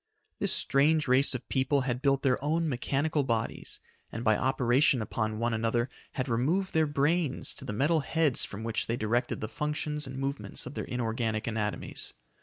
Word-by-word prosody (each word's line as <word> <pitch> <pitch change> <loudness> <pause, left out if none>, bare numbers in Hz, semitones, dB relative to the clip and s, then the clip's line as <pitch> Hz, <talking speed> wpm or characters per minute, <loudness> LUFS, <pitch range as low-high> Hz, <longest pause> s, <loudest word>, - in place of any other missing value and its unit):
This - - 0
strange 150 +2 +3
race 130 +2 +6
of 125 - -6
people 135 +1 +1
had 125 -1 -2
built 140 -1 +2
their 130 -1 +1
own 160 +3 +1
mechanical 145 +3 0
bodies, 115 -4 -2 0.3
and 115 - -5
by 110 -2 +4
operation 130 +2 +3
upon 110 0 -2
one 115 +1 0
another 115 +2 0 0.2
had 130 0 -2
removed 150 +12 0
their 160 -1 +3
brains 145 +1 0
to - - -10
the - - -4
metal 145 +9 +2
heads 155 -2 +1
from 105 +2 -5
which 115 -1 -2
they 115 - -1
directed 120 +4 -1
the 110 - -2
functions 150 +1 -3
and 130 0 -7
movements 135 +1 -3
of 125 - -7
their - - -4
inorganic 115 -2 -2
anatomies. 105 -2 -3
130 Hz, 180 wpm, -29 LUFS, 115-150 Hz, 0.3 s, race